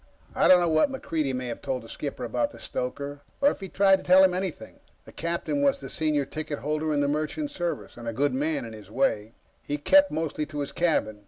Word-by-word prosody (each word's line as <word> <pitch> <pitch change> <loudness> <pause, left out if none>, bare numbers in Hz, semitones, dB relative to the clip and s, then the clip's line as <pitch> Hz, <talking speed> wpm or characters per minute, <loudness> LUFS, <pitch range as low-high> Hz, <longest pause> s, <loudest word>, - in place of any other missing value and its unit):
I - - +3
don't 185 - +8
know 175 - +2
what 155 - +3
MacReidie 155 - -2
may 125 0 -3
have 115 - -6
told 130 -3 -3
the - - -12
skipper - - -5
about - - 0
the - - -14
stoker, 140 +3 -5 0.2
or 285 +1 +5
if - - -8
he 195 -1 -7
tried 195 0 +4
to - - -11
tell 185 +1 +7
him 185 -1 +4
anything. 185 -3 -5 0.3
The - - -12
captain 170 - -2
was 280 -1 +3
the - - -8
senior 150 -3 0
ticket 155 0 -5
holder 155 +2 -2
in 145 -1 +1
the 145 - +2
Merchant 155 - -2
Service, 175 - -4
and 120 -1 -8
a - - 0
good 140 +4 +1
man, 145 0 -1
in 115 - -8
his 105 -3 -11
day. 110 -2 0 0.3
He 145 - -3
kept 285 - +5
mostly 155 -1 -2
to 150 -1 -4
his 140 - -3
cabin. 155 -11 0
155 Hz, 240 wpm, -26 LUFS, 135-180 Hz, 0.3 s, don't